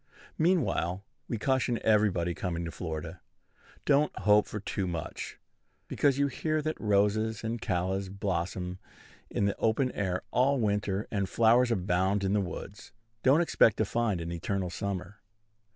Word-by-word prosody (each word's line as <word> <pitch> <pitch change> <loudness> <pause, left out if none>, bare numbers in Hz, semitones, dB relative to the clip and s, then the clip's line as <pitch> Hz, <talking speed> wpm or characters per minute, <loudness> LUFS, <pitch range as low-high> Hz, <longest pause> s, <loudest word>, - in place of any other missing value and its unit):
Meanwhile, 145 - +1 0.2
we 115 - -2
caution 130 +1 +1
everybody 100 -6 +2
coming 85 -1 -3
to 85 - -4
Florida, 80 0 -6 0.6
Don't 145 +1 +3
hope 105 +1 +4
for 105 - -5
too 95 -1 -3
much. 85 -3 -5 0.5
Because 140 -2 +2
you 140 - +3
hear 155 +3 -1
that 155 +1 -3
roses 105 +1 +1
and 115 0 -3
callas 95 +2 -1
blossom 90 -1 -3 0.5
in 100 - 0
the 100 - 0
open 125 +4 +1
air 95 -2 -2
all 135 +2 +3
winter, 105 -2 0
and 100 -3 -1
flowers 120 +2 +4
abound 95 -1 +1
in 95 0 +1
the 105 - +3
woods, 95 +3 -7 0.3
don't 140 +6 +5
expect 115 -9 +4
to 110 - +2
find 110 -3 0
an 85 +1 -4
eternal 90 +2 -2
summer. 100 +1 -4
100 Hz, 150 wpm, -29 LUFS, 90-115 Hz, 0.6 s, don't